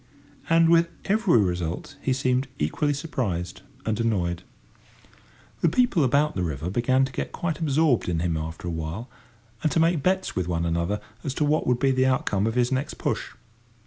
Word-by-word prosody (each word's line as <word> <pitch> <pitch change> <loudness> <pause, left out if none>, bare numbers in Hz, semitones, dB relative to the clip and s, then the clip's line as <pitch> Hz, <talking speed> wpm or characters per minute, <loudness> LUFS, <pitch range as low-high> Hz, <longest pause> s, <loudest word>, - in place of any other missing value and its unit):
And 165 0 +5
with 170 0 +4 0.2
every 205 - +3
result 90 -4 -1
he 135 - 0
seemed 130 0 +1
equally 110 - 0
surprised 105 - -3 0.2
and 110 0 -1
annoyed. 90 -7 0 1.2
The 170 - +3
people 200 - +3
about 145 +4 +2
the 90 - -2
river 80 0 -3
began 130 +5 +2
to 135 - -7
get - - -4
quite 165 -3 -3
absorbed 150 - +2
in 85 - 0
him 85 -1 0
after 80 +2 -5
a - - -1
while, 80 +10 -5 0.5
and 155 - +1
to - - +2
make 165 -1 +3
bets 185 +4 0
with 90 -2 -1
one 85 -1 -1
another 85 +5 -1 0.2
as 135 -3 -3
to 150 - +1
what 150 +2 +1
would 125 - +3
be 135 +2 +2
the 130 0 +2
outcome 110 -6 +1
of 115 - -2
his 125 0 +2
next 130 +2 -1
push. - - -3
125 Hz, 185 wpm, -25 LUFS, -, 1.2 s, And